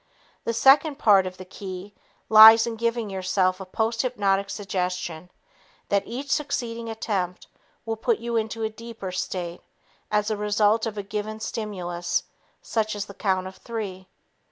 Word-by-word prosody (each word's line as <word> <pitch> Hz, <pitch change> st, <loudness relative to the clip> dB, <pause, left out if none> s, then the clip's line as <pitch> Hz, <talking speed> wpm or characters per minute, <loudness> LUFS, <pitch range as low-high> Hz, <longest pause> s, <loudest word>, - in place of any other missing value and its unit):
The 230 Hz, -, 0 dB
second 280 Hz, +4 st, +5 dB
part 200 Hz, -7 st, +5 dB
of 185 Hz, 0 st, -8 dB
the 185 Hz, -, -9 dB
key 190 Hz, +1 st, -8 dB, 0.3 s
lies 220 Hz, +1 st, +10 dB
in 235 Hz, -1 st, -3 dB
giving 230 Hz, -2 st, -1 dB
yourself 185 Hz, 0 st, 0 dB
a 190 Hz, -, -8 dB
posthypnotic 210 Hz, -2 st, 0 dB
suggestion 180 Hz, -4 st, -3 dB, 0.6 s
that 200 Hz, 0 st, +1 dB
each 270 Hz, +4 st, -5 dB
succeeding 235 Hz, -6 st, -2 dB
attempt 195 Hz, -5 st, -3 dB, 0.4 s
will 225 Hz, -1 st, -2 dB
put 235 Hz, 0 st, +1 dB
you 235 Hz, 0 st, -4 dB
into 225 Hz, 0 st, -1 dB
a 220 Hz, -, 0 dB
deeper 225 Hz, -4 st, -8 dB
state 180 Hz, -1 st, -4 dB, 0.5 s
as 210 Hz, +1 st, +1 dB
a -, -, +1 dB
result 210 Hz, +2 st, +2 dB
of 215 Hz, -1 st, -5 dB
a 205 Hz, -, -3 dB
given 210 Hz, +2 st, -4 dB
stimulus 180 Hz, -6 st, -3 dB, 0.4 s
such 215 Hz, -2 st, -1 dB
as 205 Hz, -1 st, -3 dB
the 200 Hz, -, -11 dB
count 190 Hz, -2 st, 0 dB
of 190 Hz, 0 st, -9 dB
three. 200 Hz, -5 st, -6 dB
210 Hz, 155 wpm, -25 LUFS, 190-225 Hz, 0.6 s, lies